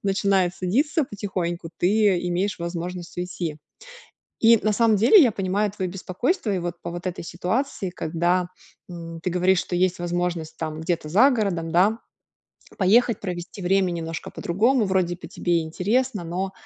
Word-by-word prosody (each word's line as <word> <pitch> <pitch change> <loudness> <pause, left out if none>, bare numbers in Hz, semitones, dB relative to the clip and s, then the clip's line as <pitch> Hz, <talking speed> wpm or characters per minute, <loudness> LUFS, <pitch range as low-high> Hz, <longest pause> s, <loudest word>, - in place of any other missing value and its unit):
начинает 195 -2 +1
садиться 280 - +1
потихоньку, 180 -6 -4
ты 200 0 +3
имеешь 185 +3 -1
возможность 175 +1 -5
уйти. 175 -3 -4 0.8
И 230 0 +6
на 215 +1 +2
самом 225 0 +3
деле 245 - +7
я 245 -5 +4
понимаю 195 +2 0
твоё 190 -3 -3
беспокойство 195 - -2
и - - 0
вот 175 0 -5
по 170 - -5
вот 175 +1 -7
этой 180 - -4
ситуации, 185 +4 -2
когда, 175 +1 0 0.4
м, 165 -1 -8
ты 180 - -1
говоришь, 180 +1 +3
что 175 - -3
есть 185 0 +1
возможность 175 -2 -2
там 155 -1 -4
где-то 160 -1 -2
за 220 - +5
городом, 195 -9 -1
да, 200 +6 +3 0.8
поехать, 225 +5 +3
провести 180 0 -6
время 190 +1 +2
немножко 165 -1 -5
по-другому, 225 +7 +1
вроде 185 -2 0
бы 165 -2 -11
тебе 175 0 0
и - - -1
интересно, 200 +5 -1
но, 185 +3 -3
185 Hz, 160 wpm, -24 LUFS, 175-205 Hz, 0.8 s, деле